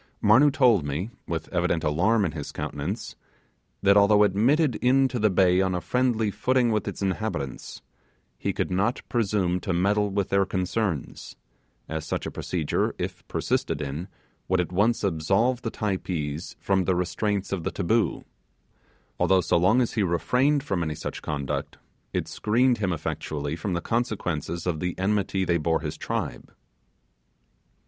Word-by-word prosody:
Marnoo 145 Hz, +3 st, +6 dB
told 125 Hz, -, +4 dB
me 75 Hz, +10 st, -3 dB, 0.2 s
with 80 Hz, -2 st, -3 dB
evident 85 Hz, -2 st, 0 dB
alarm 95 Hz, +8 st, +2 dB
in 85 Hz, -, -1 dB
his 75 Hz, -3 st, -6 dB
countenance, 95 Hz, +10 st, -4 dB, 0.7 s
that 100 Hz, 0 st, +5 dB
although 105 Hz, +1 st, +6 dB
admitted 125 Hz, +8 st, +3 dB
into 130 Hz, 0 st, +2 dB
the 105 Hz, 0 st, +3 dB
bay 90 Hz, -1 st, +4 dB
on 95 Hz, -1 st, 0 dB
a -, -, 0 dB
friendly 115 Hz, 0 st, +1 dB
footing 125 Hz, +1 st, +2 dB
with 105 Hz, -2 st, -1 dB
its -, -, -4 dB
inhabitants, 95 Hz, -, -3 dB, 0.6 s
he -, -, -1 dB
could -, -, -2 dB
not 105 Hz, +7 st, 0 dB
presume 100 Hz, -6 st, +1 dB
to 95 Hz, 0 st, -2 dB
meddle 100 Hz, +4 st, +2 dB
with 100 Hz, -1 st, -1 dB
their 100 Hz, 0 st, +3 dB
concerns, 95 Hz, -3 st, -3 dB, 0.5 s
as 80 Hz, -1 st, -4 dB
such -, -, -3 dB
procedure, 80 Hz, -5 st, -1 dB
if -, -, -5 dB
persisted -, -, -1 dB
in, 75 Hz, +5 st, -4 dB, 0.4 s
would 95 Hz, 0 st, +2 dB
at 90 Hz, -, -1 dB
once 105 Hz, +6 st, +2 dB
absolve 100 Hz, +8 st, +1 dB
the 115 Hz, -, -2 dB
Typees 90 Hz, -8 st, -3 dB
from 95 Hz, -2 st, +1 dB
the 95 Hz, -, +2 dB
restraints 100 Hz, +3 st, -1 dB
of 95 Hz, -4 st, -2 dB
the -, -, -1 dB
'taboo', 110 Hz, +5 st, 0 dB, 1.0 s
although 95 Hz, -1 st, +4 dB
so -, -, +1 dB
long 95 Hz, +9 st, +4 dB
as 120 Hz, -, -1 dB
he 110 Hz, -, +1 dB
refrained 125 Hz, +11 st, +2 dB
from 95 Hz, -10 st, -1 dB
such -, -, -6 dB
conduct, 70 Hz, -3 st, -3 dB, 0.3 s
it -, -, -2 dB
screened 120 Hz, +3 st, +2 dB
him 100 Hz, -3 st, 0 dB
effectually 75 Hz, -2 st, -3 dB
from 90 Hz, +3 st, -3 dB
the 85 Hz, -, -1 dB
consequences 90 Hz, -, -2 dB
of 85 Hz, -4 st, -1 dB
the 90 Hz, 0 st, -3 dB
enmity 95 Hz, -1 st, 0 dB
they 85 Hz, -1 st, +1 dB
bore 80 Hz, +1 st, +1 dB
his 75 Hz, -2 st, -4 dB
tribe. -, -, -4 dB
95 Hz, 155 wpm, -26 LUFS, 85-110 Hz, 1.0 s, Marnoo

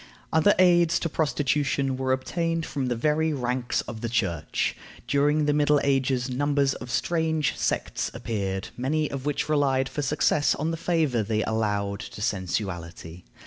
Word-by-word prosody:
Other 160 Hz, +6 st, +5 dB
aids 175 Hz, -2 st, +5 dB
to 165 Hz, -, -1 dB
prostitution 145 Hz, -3 st, 0 dB
were 130 Hz, 0 st, -1 dB
obtained 165 Hz, +5 st, -1 dB
from 135 Hz, -4 st, -3 dB
the 120 Hz, -, 0 dB
very 155 Hz, +5 st, +1 dB
ranks 125 Hz, -2 st, -1 dB
of 110 Hz, -2 st, -8 dB
the 120 Hz, -, -2 dB
Church. 90 Hz, -9 st, -1 dB, 0.3 s
During 145 Hz, +3 st, +2 dB
the 150 Hz, -, +2 dB
Middle 150 Hz, 0 st, +3 dB
Ages 135 Hz, -2 st, +1 dB
numbers 140 Hz, +1 st, +1 dB
of 125 Hz, -, -8 dB
strange 160 Hz, +3 st, 0 dB
sects -, -, -1 dB
appeared, 100 Hz, -5 st, -3 dB
many 150 Hz, +5 st, -1 dB
of 140 Hz, 0 st, -4 dB
which 145 Hz, -, -1 dB
relied 135 Hz, -3 st, +2 dB
for 145 Hz, -, -4 dB
success 145 Hz, +1 st, +2 dB
on 155 Hz, +3 st, -2 dB
the -, -, -1 dB
favor 160 Hz, -8 st, +1 dB
they 110 Hz, +1 st, 0 dB
allowed 105 Hz, -3 st, -1 dB
to -, -, -8 dB
sensuality. 90 Hz, -4 st, -4 dB
135 Hz, 155 wpm, -26 LUFS, 115-150 Hz, 0.3 s, Other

